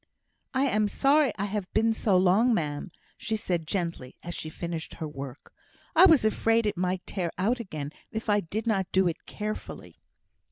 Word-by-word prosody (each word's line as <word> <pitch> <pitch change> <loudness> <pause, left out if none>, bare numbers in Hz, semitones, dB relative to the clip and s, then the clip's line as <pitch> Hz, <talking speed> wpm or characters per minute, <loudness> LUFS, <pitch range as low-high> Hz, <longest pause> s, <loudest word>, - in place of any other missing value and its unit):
"I 265 - +3
am 215 -6 +2
sorry 280 +5 +3
I 200 - -1
have 200 -2 -4
been 225 +1 +3
so 205 -3 +2
long, 200 +7 +4
ma'am," 145 -4 -2 0.3
said 205 -6 -1
she, - - -15
gently, 170 -7 -3
as 175 - -5
she 155 - -5
finished 170 0 -5
her 160 - -5
work. 140 -2 -9 0.4
"I 360 +4 +9
was 315 -10 +5
afraid 225 +1 +2
it 210 - 0
might 180 +1 -1
tear 180 -4 -2
out 225 +8 +1
again 155 -10 -5 0.2
if 220 +1 -5
I 205 -1 +4
did 205 +4 -4
not 195 -5 0
do 190 -1 +3
it 165 - -4
carefully." 215 0 -6
195 Hz, 185 wpm, -28 LUFS, 170-220 Hz, 0.4 s, I